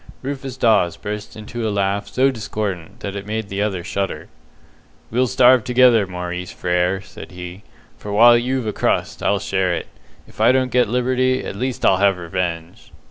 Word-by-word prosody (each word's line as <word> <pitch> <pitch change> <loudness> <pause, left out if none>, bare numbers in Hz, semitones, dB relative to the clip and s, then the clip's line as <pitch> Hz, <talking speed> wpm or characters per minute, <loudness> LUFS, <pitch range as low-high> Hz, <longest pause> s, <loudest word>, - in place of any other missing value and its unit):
Rufus 135 -1 -5
Dawes 105 -8 +3
burst 105 0 -6
into 110 +1 -5
a - - 0
laugh 100 0 -1
so 135 +1 +2
discordant 105 -7 -5
that 100 0 -5
it 100 0 -6
made 110 -1 -3
the 100 +1 -3
other 95 -4 -1
shudder. 100 +2 -4 0.8
"We'll 125 +3 +2
starve 125 -1 +5
together, 125 -4 +4
Maurice 90 0 -5
Frere," 90 +2 0
said 95 - -11
he, 90 +2 -8 0.4
"for 105 - -7
while 120 +3 +7
you've 125 +1 0
a 105 - -2
crust, - - -1
I'll 100 - +2
share 95 -2 0
it. - - -4 0.4
If - - -9
I 115 +3 +6
don't 130 -1 +1
get 125 -3 +3
liberty, 130 +1 +1
at - - -5
least 130 +3 -2
I'll 95 - +5
have 100 -1 +3
revenge!" 85 -1 -4
105 Hz, 180 wpm, -20 LUFS, 95-125 Hz, 0.8 s, while